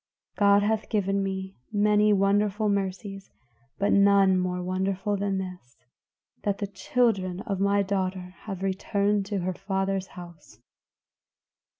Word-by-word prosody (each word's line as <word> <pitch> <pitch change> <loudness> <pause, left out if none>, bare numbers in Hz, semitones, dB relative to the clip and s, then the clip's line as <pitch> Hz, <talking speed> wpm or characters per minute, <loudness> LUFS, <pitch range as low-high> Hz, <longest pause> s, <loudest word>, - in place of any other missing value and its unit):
God 200 0 +4
hath 220 +1 0
given 200 -2 0
me 190 0 -4
many 210 0 +3
wonderful 205 +1 +2
mercies, 195 0 -3 0.5
but 200 - +1
none 200 -1 +5
more 180 0 -1
wonderful 190 +2 -1
than 200 -1 -1
this, 180 -9 -7 0.6
that 200 -1 -1
the 205 - -2
children 200 -5 0
of 200 -4 -3
my 200 +1 +2
daughter 185 -2 -2
have 195 -3 -5
returned 200 +1 0
to 200 -2 -2
her 185 +1 -2
father's 195 0 -2
house." 170 -10 -12
195 Hz, 125 wpm, -26 LUFS, 190-205 Hz, 0.6 s, none